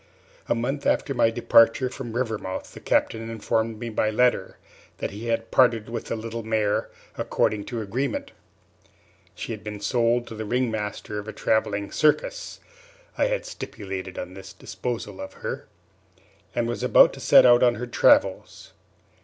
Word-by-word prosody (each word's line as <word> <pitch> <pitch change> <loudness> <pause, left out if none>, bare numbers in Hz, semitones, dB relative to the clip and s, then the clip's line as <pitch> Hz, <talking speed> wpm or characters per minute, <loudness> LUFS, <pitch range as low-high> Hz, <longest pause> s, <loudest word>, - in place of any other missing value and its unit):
A - - +3
month 135 +5 -2
after 140 - +1
my 115 - +3
departure 115 +2 +4
from 125 -2 -7
Rivermouth 110 -6 -3
the - - -10
Captain 115 0 0
informed 115 0 -1
me 115 +2 -5
by 110 -1 0
letter 115 -3 +1 0.4
that - - -4
he 105 +4 -7
had 115 0 -1
parted 115 -4 +3
with 115 -1 -4
the - - -3
little 115 +1 -5
mare, 110 -2 0 0.3
according 105 -2 0
to 120 -2 -4
agreement. 115 +5 -3 1.0
She - - -6
had 110 -2 -6
been 105 -1 -6
sold 120 +2 +1
to 115 - -9
the 110 0 -5
ring 125 +2 0
master 105 -1 -4
of 105 - -8
a - - -4
travelling 100 -2 0
circus - - 0 0.6
(I - - +2
had - - -2
stipulated 95 - -7
on 90 0 -6
this 95 0 -10
disposal 105 +1 -5
of 95 - -7
her), - - -6 0.9
and 120 -1 0
was 120 - -3
about - - +6
to - - -10
set - - +7
out 120 -1 +7
on 120 -1 +4
her 125 - -4
travels. 120 - +2
115 Hz, 165 wpm, -25 LUFS, 105-120 Hz, 1.0 s, set